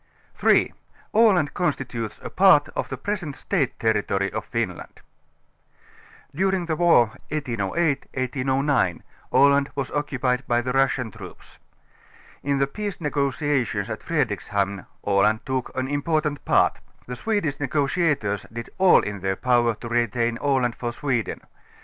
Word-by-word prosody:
3) - - +3 0.4
Aland 200 -9 +4
constitutes 125 -10 -3
a - - -5
Part 185 -6 +5
of - - -4
the 130 - -4
Present 175 -2 -4
State 140 -3 -1
Terri 110 -2 +2
tory 100 0 0
of - - -3
Finland. - - -4 1.3
During 190 +2 0
the 160 -2 -1
war 165 -9 +5 0.2
1808 140 - -1
ŌĆö - - -30
1809 130 - 0 0.3
Aland 140 0 +4
was 140 -2 -3
occupied 130 -3 -1
by 120 -1 +2
the 125 +1 -2
Russian 135 -3 +1
troops. - - -13 0.8
In 140 0 0
the 140 - +3
peace 205 +7 -5
negotiations 140 - -1
at 110 - -5
Fredrikshamn 100 - -1 0.2
Aland 105 +2 +2
took 130 -1 -2
an 130 0 -1
important 150 +1 -1
part. - - +3 0.3
The 125 - -6
Swedish 185 - -1
negotiators 140 - 0
did 115 +1 -7
all 190 -1 +6
in 100 -1 -5
their 95 +1 -1
power 120 0 +2
to 115 - -8
retain 120 0 0
Aland 130 -4 +1
for 120 -1 -3
Sweden. 120 -2 -2
135 Hz, 135 wpm, -24 LUFS, 115-150 Hz, 1.3 s, all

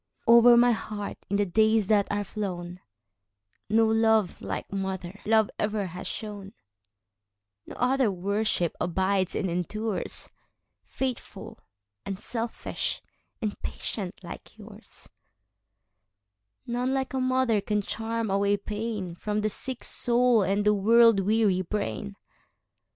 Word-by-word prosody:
Over 235 +1 +8
my 245 +1 +6
heart, 210 -2 -4
in 200 - 0
the 205 0 +2
days 220 +3 +3
that 205 0 +3
are 205 0 -1
flown, 180 -4 -5 0.9
No 225 +1 +4
love 220 -3 +2
like 95 -1 -5
mother 190 -1 -4
love 220 -1 +3
ever 210 -1 0
has 180 0 -7
shone; 205 -2 -6 1.1
No - - -9
other 255 -1 +2
worship 195 -1 -1
abides 190 +1 0
and 190 - 0
endures,—Faithful, 220 +5 -5 0.4
unselfish, 225 +4 -4 0.4
and 210 -1 -3
patient 190 -5 -5
like - - -10 2.1
yours:None 250 +2 -1
like 265 -1 -2
a 265 - 0
mother 255 -4 +2
can 210 +1 -1
charm 225 0 -3
away 200 +1 +2
painFrom 210 -1 -3
the 215 - +2
sick 255 +4 -5
soul 240 -1 +3
and 200 +2 +1
the 210 - +5
world 225 +1 +5
weary 200 -1 +2
brain. 205 +1 -4
210 Hz, 110 wpm, -27 LUFS, 195-225 Hz, 2.1 s, Over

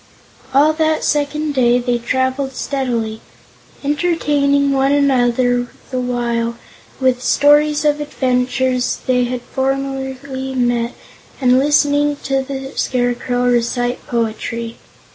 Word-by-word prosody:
All 290 +4 +4
that 315 0 0
second 295 +1 0
day 245 -2 +3
they 245 -1 0
traveled 260 +3 -1
steadily, 235 -6 -2 0.6
entertaining 285 -2 +1
one 270 0 +2
another 245 -3 +2 0.2
the 255 - -1
while 235 -1 -1 0.4
with 255 -2 +1
stories 295 +3 +3
of 295 0 +2
adventures 255 -2 0
they 250 -1 +2
had 245 0 -4
formerly 265 0 -3
met 240 -1 0 0.4
and 255 -1 +4
listening 290 +1 +2
to 270 0 0
the 270 0 -6
Scarecrow 245 0 -1
recite 245 0 0
poetry. 230 0 -3
260 Hz, 105 wpm, -18 LUFS, 245-280 Hz, 0.6 s, All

